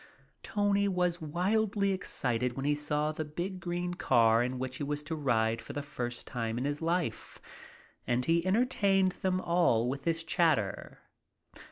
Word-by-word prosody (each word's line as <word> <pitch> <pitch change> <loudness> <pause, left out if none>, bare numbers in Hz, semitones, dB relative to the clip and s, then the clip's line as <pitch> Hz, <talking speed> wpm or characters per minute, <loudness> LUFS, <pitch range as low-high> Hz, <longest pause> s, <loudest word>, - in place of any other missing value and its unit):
Tony 200 -1 +1
was 180 -2 0
wildly 200 +5 +1
excited 125 -9 -1
when 135 +2 -4
he 145 - +3
saw 150 +1 -1
the 155 0 -4
big 175 +5 -5
green 175 0 -3
car 115 -8 +4
in 125 +1 -1
which 130 0 -4
he - - -4
was 145 +1 -3
to 160 +2 -4
ride 115 -6 +1
for - - -9
the 145 - -3
first 120 -4 -5
time 115 -2 -3
in 125 - -2
his 145 +1 -2
short 165 - -3
life, 170 -10 -2 0.7
and 125 +1 +1
he 165 +1 +2
entertained 195 -2 +2
them 185 0 -1
all 170 -11 +2
with 135 +2 -4
his 165 0 0
chatter. 155 - 0
155 Hz, 170 wpm, -31 LUFS, 125-180 Hz, 0.7 s, car